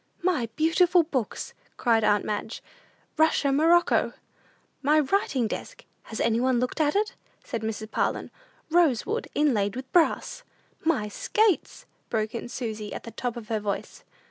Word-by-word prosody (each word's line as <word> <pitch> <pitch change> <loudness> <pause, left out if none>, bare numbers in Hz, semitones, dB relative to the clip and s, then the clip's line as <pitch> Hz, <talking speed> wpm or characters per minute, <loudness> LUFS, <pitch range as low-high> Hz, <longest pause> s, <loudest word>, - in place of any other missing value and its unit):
"My 315 -11 +1
beautiful 340 +2 +4
books!" 260 -9 -3 0.2
cried 230 -3 +2
aunt 210 -1 +3
Madge; 215 +1 -4 0.5
"Russia 315 -3 +3
morocco." 330 +5 +3 0.7
"My 300 +3 +4
writing 285 - +1
desk, - - -7 0.2
has 220 - -6
any 230 0 +2
one 255 -1 +2
looked 250 +6 -1
at 295 +2 +2
it?" 420 +1 +1 0.3
said 230 - -4
Mrs. 220 0 -4
Parlin; - - -1 0.4
"rose 325 -9 +3
wood, 450 +3 -2
inlaid 230 -9 +2
with 260 +1 -8
brass." 350 +7 +2 0.4
"My 305 -10 +1
skates!" 425 - 0 0.2
broke 215 -1 -1
in 235 0 -5
Susy, 220 -4 -5
at - - -7
the 230 - -8
top 240 +2 -4
of 220 -2 -9
her 220 -1 0
voice. 205 -1 -4
255 Hz, 150 wpm, -26 LUFS, 220-325 Hz, 0.7 s, beautiful